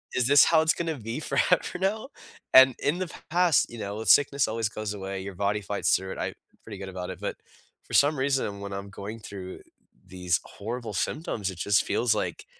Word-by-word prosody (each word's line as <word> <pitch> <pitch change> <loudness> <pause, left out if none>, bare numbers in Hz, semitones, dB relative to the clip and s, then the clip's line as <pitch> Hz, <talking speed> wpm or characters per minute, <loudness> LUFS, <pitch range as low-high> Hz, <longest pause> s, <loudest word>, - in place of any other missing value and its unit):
Is 125 - +2
this 145 +1 +7
how 160 -1 +4
it's 160 +1 +3
gonna 165 -3 -3
be 115 +4 -5
forever 180 - +1
now?" 215 +7 -1 0.4
And 130 -1 +8
in 155 +5 +1
the 185 -2 -3 0.2
past, 175 -2 +4
you 120 - -9
know, 105 +1 -4
sickness 140 -1 +4
always 110 -1 -1
goes 110 -1 -4
away. 95 -1 -5
Your 100 +1 -7
body 100 +3 0
fights 100 0 +1
through 95 0 -3
it. - - -9
I'm - - -2 0.3
pretty 105 -3 -9
good 95 - -6
about 90 -1 -6
it. - - -9
But, - - -4 0.5
for - - -12
some 145 +1 +4
reason, 130 -7 0
when 100 0 -6
I'm 100 0 -6
going 100 +3 -7
through 95 -3 -9 0.5
these 90 -2 -1
horrible 115 +1 -6
symptoms, 105 - -2
it 90 - -11
just 100 +1 +2
feels 120 -2 +1
like, 90 -5 -3
110 Hz, 205 wpm, -27 LUFS, 100-140 Hz, 0.5 s, And